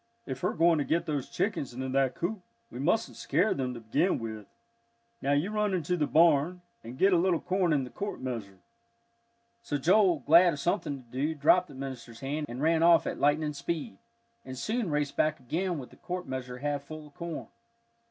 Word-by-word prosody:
"If 130 0 -5
we're - - 0
going 165 0 +4
to - - +1
get 165 +4 0
those 145 -4 -3
chickens 195 - -2
into 130 +1 -3
that 135 -1 +1
coop, 190 +4 -3 0.3
we - - -7
mustn't 180 +11 0
scare 180 +9 +1
them 125 -2 -3
to - - -7
begin 115 - +1
with. 110 -3 -6 0.7
Now, 140 - +1
you 150 +8 +1
run 210 -2 +1
into 180 0 -1
the 150 -4 0
barn, 165 +2 +3 0.2
and 120 +3 -9
get 195 +4 +4
a - - +5
little 175 -1 +2
corn 180 -1 0
in 145 -3 +2
the 125 - -8
quart 205 +1 -5
measure." 115 -7 -5 1.0
So 150 -11 -2
Joel, 180 +4 +4
glad 170 +2 +7
of 145 - -6
something 140 -4 -1
to 120 - -27
do, 145 +5 -1
dropped 175 +5 +4
the 140 - -13
minister's 125 -4 -7
hand, 145 +3 -3
and 125 +4 -5
ran 165 0 +3
off 170 0 +6
at - - -3
lightning 150 +2 +2
speed, 170 +8 -4 0.4
and 130 0 -8
soon 220 - -1
raced 150 -2 -1
back 155 0 +1
again 170 +7 -2
with 130 -3 -8
the - - -17
quart 180 0 -5
measure 125 -1 -5
half 145 +1 -2
full 155 +1 -9
of 145 - -17
corn. 170 +1 -6
150 Hz, 205 wpm, -29 LUFS, 130-175 Hz, 1.0 s, glad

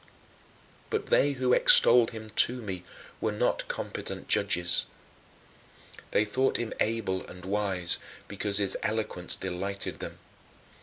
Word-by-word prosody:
But - - -2
they 145 0 +4
who 130 -1 +1
extolled 120 -1 +7
him 110 -1 -9
to 125 +3 +2
me 95 -6 -6 0.4
were - - 0
not - - -1
competent - - -5
judges. 90 0 +2 1.2
They 105 - +2
thought 130 +6 +1
him 120 -2 -4
able 105 -4 -1
and 90 0 -11
wise 95 -3 0 0.3
because 100 0 -1
his 100 -2 +1
eloquence 110 -5 -1
delighted 95 +2 -4
them. - - -7
105 Hz, 120 wpm, -28 LUFS, 95-115 Hz, 1.2 s, extolled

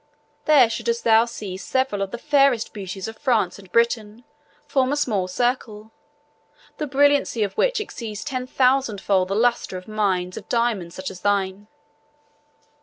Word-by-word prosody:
There 285 -6 +6
shouldst 235 +1 -2
thou 225 0 +5
see 205 -5 -7
several 210 +2 -1
of 195 - -1
the 240 - -6
fairest 275 -3 +2
beauties 190 -1 -6
of 225 0 -9
France 230 -10 +1
and 190 -2 -16
Britain 230 0 0 0.4
form 265 -1 +1
a - - +1
small 210 -10 0
circle, 220 0 -2 0.9
the 300 - -3
brilliancy 280 -4 +2
of 200 -2 -3
which - - +1
exceeds 220 - -6
ten 255 -3 -4
thousandfold 230 -8 +2
the 195 - -2
lustre 235 -4 +1
of 185 - -11
mines 190 -4 -1
of - - -9
diamonds 230 -8 0
such 185 0 -5
as 185 - -11
thine." 200 0 -1
225 Hz, 155 wpm, -23 LUFS, 195-255 Hz, 0.9 s, There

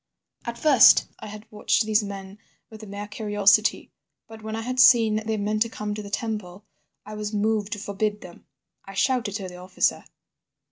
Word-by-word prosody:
"At 235 0 -5
first 275 -2 +6
I - - -9
had 210 +1 -10
watched 215 +1 +1
these 215 0 +2
men 200 0 -8 0.3
with 220 0 -11
a 215 - -10
mere 200 +1 -7
curiosity, 210 0 +1 0.4
but 220 0 -12
when 220 0 -5
I 225 - -4
had 255 +2 -4
seen 225 -4 +6
they 220 -1 -1
meant 210 +1 -2
to 230 - +2
come 210 -2 -5
to 210 - -5
the 200 - -9
temple 210 -3 -5 0.4
I 210 - -9
was 210 0 -5
moved 210 0 0
to - - -5
forbid 205 +1 -3
them. 175 - -14 0.4
I 195 - -11
shouted 245 -2 0
to 195 -3 -4
the 180 -1 -10
officer. 185 +1 -1
210 Hz, 190 wpm, -24 LUFS, 200-220 Hz, 0.4 s, first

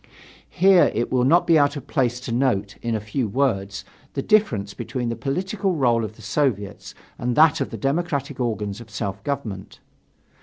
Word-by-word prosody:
Here 190 0 +5
it 120 - -1
will 125 -1 +2
not 170 +6 +4
be 165 -2 +5
out 145 0 +2
of 145 - -7
place 125 -4 0
to 130 - -5
note, 115 -5 0
in 115 -1 -1
a - - 0
few 110 +4 -2
words, 100 -5 -1 0.3
the - - -2
difference 110 - +2
between 125 -3 -4
the 115 - -2
political 185 - -2
role 120 -5 +2
of 110 0 -6
the 110 - -15
Soviets 105 -3 -2 0.2
and 120 0 -1
that 155 0 +5
of - - -1
the - - -6
democratic 140 -2 -2
organs 105 -3 -2
of 115 - -13
self 100 -2 -4
government. 120 -10 -5
125 Hz, 185 wpm, -23 LUFS, 110-145 Hz, 0.3 s, Here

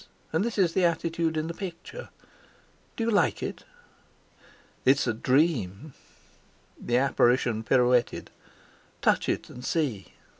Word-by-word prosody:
And 160 +4 +2
this 235 0 -3
is 180 -4 +3
the 190 - +2
attitude 165 -1 0
in 155 - -1
the 170 - -4
picture. 190 - -8 0.9
Do 230 - -2
you 230 - +1
like 205 - +2
it?" - - -5 1.2
"It's 135 +2 +4
a 120 - 0
dream." 130 - 0 0.9
The 120 - 0
apparition 125 -3 +2
pirouetted. 125 0 +2 0.7
"Touch - - +2
it, - - -1
and 125 - -10
see." 130 - -2
150 Hz, 125 wpm, -27 LUFS, 125-170 Hz, 1.2 s, It's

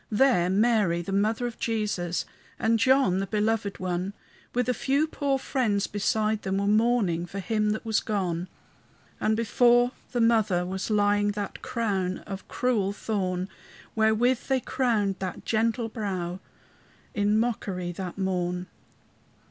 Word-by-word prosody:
There 210 -6 +3
Mary, 200 -4 +2
the 195 - -5
mother 215 +5 +1
of 240 -2 -5
Jesus, 210 -6 -1 0.3
And 225 0 +2
John, 255 -6 +4
the 195 - -2
belovèd 210 0 0
one, 185 +1 -2 0.4
With 250 0 0
a 250 - +2
few 275 +5 +1
poor 285 -3 -1
friends 235 -7 0
beside 215 +1 0
them, 190 0 -1
Were 200 - 0
mourning 210 -5 +2
for 195 - -8
Him 210 +2 0
that 215 - -6
was 220 -2 +2
gone. 180 -5 -2 0.7
And 220 0 +1
before 240 +2 +4 0.2
the 245 - -1
mother 220 -6 +3
was 190 +3 -4
lying 205 -1 +2
That 205 -1 -5
crown 195 -6 -1
of 195 0 -7
cruel 215 -6 0
thorn, 185 -4 -2 0.5
Wherewith 225 +3 +2
they 265 -1 +2
crowned 220 -7 0
that 185 -2 -5
gentle 230 +1 +1
brow 190 -5 -3 0.7
In 205 +1 +2
mockery 195 -6 -2
that 180 +1 -6
morn. 180 -2 -1
210 Hz, 140 wpm, -27 LUFS, 190-230 Hz, 0.7 s, John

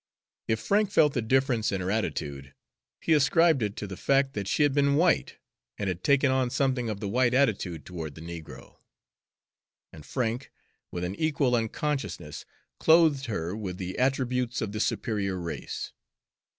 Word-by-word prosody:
If 110 0 +1
Frank 205 0 +2
felt 150 -7 +4
the 125 - 0
difference 125 -1 +1
in 95 - -1
her 95 +1 -2
attitude, 70 -10 -3 0.5
he 165 - +2
ascribed 155 0 +4
it 105 -1 -1
to - - -5
the 95 -1 -7
fact 135 +6 +2
that 100 -2 -4
she 150 - +2
had 145 -2 +3
been 140 0 +3
white, 170 +3 +2 0.4
and 100 - -3
had 90 -1 -3
taken 140 -1 +4
on 130 -1 +1
something 130 -2 0
of 105 -2 -4
the 105 - -3
white 125 +3 +2
attitude 100 - +1
toward 80 -5 -6
the 80 - -10
negro; 80 -6 -10 1.2
and 75 - -11
Frank, 120 - -3 0.4
with 90 - -5
an 90 +1 -2
equal 145 -5 +1
unconsciousness, 115 - -3 0.3
clothed 160 -4 +4
her 90 -4 -3
with 95 -5 -5
the 95 0 -5
attributes 125 -2 0
of 110 - -3
the 105 - -4
superior 100 -4 -1
race. 85 -2 -5
115 Hz, 165 wpm, -27 LUFS, 95-135 Hz, 1.2 s, felt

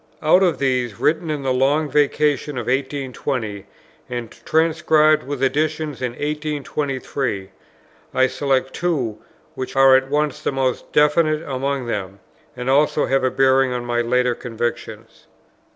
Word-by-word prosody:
Out 160 +5 +5
of 175 -5 +2
these, 125 -5 -1
written 160 +2 +1
in 150 -2 -2
the 130 -1 +1
Long 140 +4 +2
Vacation 145 -1 +1
of 120 - -3
1820, 130 -6 -3 0.4
and 120 -2 -5
transcribed 155 -1 +2
with 135 0 -5
additions 150 +2 -1
in 125 -2 -2
1823, 140 -7 -3 0.6
I 130 - +3
select 135 -1 0
two, 135 -12 -2 0.3
which 130 -3 -6
are 135 0 +7
at 135 0 +1
once 150 0 0
the - - -1
most 135 -2 -2
definite 155 +1 +3
among 135 0 -2
them, 100 -4 -4 0.4
and 125 0 -5
also 145 +2 +3
have 135 -1 +1
a 130 - +3
bearing 135 0 +3
on 120 -1 -4
my 120 0 0
later 125 +1 +1
convictions. 120 -1 -6
135 Hz, 140 wpm, -21 LUFS, 125-150 Hz, 0.6 s, are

